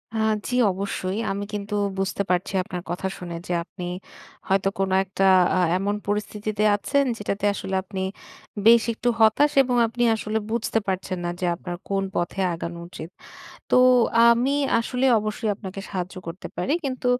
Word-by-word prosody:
অ্যা 220 Hz, 0 st, +1 dB, 0.2 s
জি 250 Hz, -, -2 dB, 0.2 s
অবশ্যই। 190 Hz, 0 st, -3 dB
আমি 200 Hz, +1 st, -3 dB
কিন্তু 205 Hz, 0 st, -4 dB, 0.3 s
বুঝতে 195 Hz, +1 st, -1 dB
পারছি 180 Hz, +1 st, 0 dB
আপনার 180 Hz, -1 st, -6 dB
কথা 175 Hz, +2 st, -2 dB
শুনে 175 Hz, -1 st, -7 dB
যে, 180 Hz, -, -1 dB
আপনি 180 Hz, +1 st, -8 dB, 0.6 s
হয়তো 195 Hz, 0 st, +2 dB
কোনো 190 Hz, -1 st, +1 dB
একটা 195 Hz, 0 st, -3 dB, 0.3 s
আ -, -, +2 dB, 0.2 s
এমন 200 Hz, +2 st, -1 dB
পরিস্থিতিতে 210 Hz, 0 st, -2 dB
আছেন 280 Hz, +7 st, +1 dB
যেটাতে 205 Hz, -1 st, -3 dB
আসলে 190 Hz, -1 st, -4 dB
আপনি 190 Hz, 0 st, -5 dB, 0.6 s
বেশ 230 Hz, 0 st, +7 dB
একটু 240 Hz, +2 st, -1 dB
হতাশ 225 Hz, +7 st, +5 dB
এবং 250 Hz, -1 st, -1 dB
আপনি 240 Hz, +2 st, -2 dB
আসলে 220 Hz, 0 st, -2 dB
বুঝতে 225 Hz, -1 st, 0 dB
পারছেন 185 Hz, -1 st, -2 dB
না -, -, -1 dB
যে, 185 Hz, -, -1 dB
আপনার 175 Hz, 0 st, -6 dB
কোন 195 Hz, -1 st, 0 dB
পথে 175 Hz, +3 st, -1 dB
আগানো 170 Hz, +1 st, -5 dB
উচিত। 165 Hz, -2 st, -9 dB, 0.6 s
তো, -, -, +5 dB, 0.4 s
আ -, -, +7 dB
আমি 250 Hz, +4 st, +1 dB, 0.3 s
আসলে 250 Hz, +3 st, -1 dB
অবশ্যই 215 Hz, +1 st, -2 dB
আপনাকে 195 Hz, -1 st, -8 dB
সাহায্য 185 Hz, -2 st, -4 dB
করতে 165 Hz, +3 st, -6 dB
পারি। 280 Hz, -, -1 dB
কিন্তু 255 Hz, -2 st, -3 dB
200 Hz, 165 wpm, -24 LUFS, 185-220 Hz, 0.6 s, বেশ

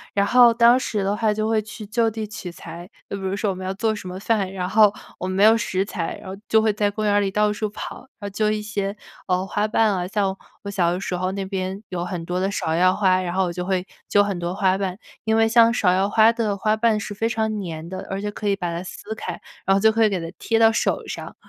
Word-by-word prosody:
然 200 Hz, -, +3 dB
后 245 Hz, +2 st, +7 dB
当 235 Hz, +2 st, +5 dB
时 210 Hz, -5 st, -2 dB
的 200 Hz, +2 st, 0 dB
话 220 Hz, -1 st, +1 dB
就 215 Hz, +1 st, -1 dB
会 220 Hz, -1 st, +2 dB
去 220 Hz, 0 st, -9 dB
就 225 Hz, +2 st, +1 dB
地 220 Hz, 0 st, -4 dB
取 205 Hz, -4 st, -7 dB
材， 170 Hz, +1 st, -10 dB, 0.2 s
就 -, -, -4 dB
比 195 Hz, -, -7 dB
如 190 Hz, 0 st, -2 dB
说 200 Hz, 0 st, 0 dB
我 -, -, -5 dB
们 185 Hz, -, -7 dB
要 185 Hz, -, -2 dB
做 220 Hz, +2 st, 0 dB
什 185 Hz, -3 st, -7 dB
么 185 Hz, -, -6 dB
饭， 200 Hz, -2 st, 0 dB
然 185 Hz, -2 st, -3 dB
后 210 Hz, +1 st, +5 dB, 0.3 s
我 185 Hz, -, -3 dB
们 185 Hz, -, -3 dB
没 200 Hz, -, +4 dB
有 220 Hz, +1 st, +7 dB
食 195 Hz, -4 st, -1 dB
材， 180 Hz, -5 st, -4 dB
然 -, -, -12 dB
后 190 Hz, -, -5 dB
就 220 Hz, -, +5 dB
会 220 Hz, -1 st, +2 dB
在 205 Hz, 0 st, +1 dB
公 215 Hz, +1 st, -3 dB
园 205 Hz, -, +2 dB
儿 205 Hz, -, +4 dB
里 195 Hz, -, 0 dB
到 210 Hz, +1 st, +1 dB
处 215 Hz, 0 st, -3 dB
跑， 210 Hz, -, -7 dB, 0.2 s
然 -, -, -50 dB
后 -, -, -2 dB
揪 210 Hz, +1 st, +1 dB
一 215 Hz, 0 st, 0 dB
些， 205 Hz, -1 st, -3 dB, 0.3 s
呃， 185 Hz, 0 st, +1 dB
花 205 Hz, +2 st, -1 dB
瓣 215 Hz, -1 st, +2 dB
啊， 180 Hz, -1 st, -2 dB
像 195 Hz, -1 st, 0 dB, 0.3 s
我 200 Hz, -, -5 dB
小 180 Hz, -4 st, +1 dB
的 180 Hz, -, -2 dB
时 185 Hz, -2 st, -3 dB
候 185 Hz, +1 st, -1 dB
那 195 Hz, 0 st, -3 dB
边 190 Hz, 0 st, -3 dB
有 175 Hz, -1 st, -3 dB
很 175 Hz, -1 st, -5 dB
多 180 Hz, +1 st, -2 dB
的 190 Hz, +1 st, 0 dB
芍 160 Hz, -5 st, -1 dB
药 185 Hz, +2 st, +4 dB
花， 185 Hz, -2 st, +3 dB
然 175 Hz, -1 st, -3 dB
后 190 Hz, +1 st, +1 dB
我 175 Hz, -, -2 dB
就 180 Hz, +1 st, -4 dB
会 185 Hz, 0 st, -1 dB, 0.2 s
揪 205 Hz, -, +5 dB
很 200 Hz, -3 st, -3 dB
多 175 Hz, +1 st, -3 dB
花 190 Hz, -1 st, +2 dB
瓣， 190 Hz, -2 st, -3 dB, 0.3 s
因 220 Hz, 0 st, +2 dB
为 225 Hz, -, +4 dB
像 230 Hz, 0 st, +5 dB
芍 185 Hz, -6 st, +2 dB
药 195 Hz, +2 st, +1 dB
花 220 Hz, +2 st, +5 dB
的 220 Hz, -4 st, -1 dB
花 215 Hz, +2 st, +1 dB
瓣 220 Hz, -1 st, +2 dB
是 205 Hz, -, -5 dB
非 225 Hz, +3 st, -1 dB
常 220 Hz, -2 st, -1 dB
粘 165 Hz, -2 st, -6 dB
的， 185 Hz, +1 st, -7 dB
而 195 Hz, -, -3 dB
且 205 Hz, +1 st, -3 dB
可 205 Hz, 0 st, -3 dB
以 200 Hz, -, +2 dB
把 175 Hz, -3 st, -3 dB
它 170 Hz, -, -3 dB
撕 205 Hz, +3 st, -7 dB
开， 180 Hz, -5 st, -6 dB, 0.3 s
然 195 Hz, 0 st, +5 dB
后 -, -, +2 dB
就 220 Hz, +2 st, +5 dB
可 225 Hz, +1 st, +2 dB
以 215 Hz, -, +5 dB
给 190 Hz, -, -1 dB
它 165 Hz, 0 st, -6 dB
贴 225 Hz, -, 0 dB
到 225 Hz, 0 st, +6 dB
手 -, -, 0 dB
上 -, -, -7 dB
200 Hz, 310 characters per minute, -23 LUFS, 185-215 Hz, 0.3 s, 后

